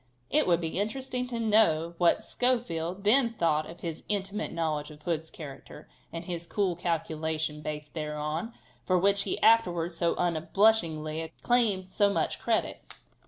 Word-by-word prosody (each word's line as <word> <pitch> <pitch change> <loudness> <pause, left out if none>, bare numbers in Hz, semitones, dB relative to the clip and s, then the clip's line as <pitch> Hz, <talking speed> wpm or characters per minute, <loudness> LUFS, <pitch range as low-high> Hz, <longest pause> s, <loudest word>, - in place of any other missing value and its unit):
It - - +3
would 170 -2 +3
be 165 +2 -2
interesting 250 +4 -2
to 240 -2 -4
know 205 -7 +3
what 175 -1 +3
Schofield 195 -8 -1
then 235 +2 +5
thought 155 -5 +1
about 170 - -11
his 165 -2 -5
intimate 205 0 -2
knowledge 155 -3 -2
of 150 0 -14
Hood's 160 -1 -2
character, 140 -4 -10 0.2
and 165 +1 -6
his 170 -1 -4
cool 190 -3 0
calculation 160 -2 -2
based 150 -1 -6
thereon, 150 +5 -3 0.3
for 185 - +2
which 200 +2 +3
he - - -2
afterwards 175 -7 +3
so 170 0 +1
unblushingly 165 -3 +1
claimed 210 -7 +2
so 205 +1 +3
much - - -1
credit. - - -1
170 Hz, 150 wpm, -28 LUFS, 160-205 Hz, 0.3 s, then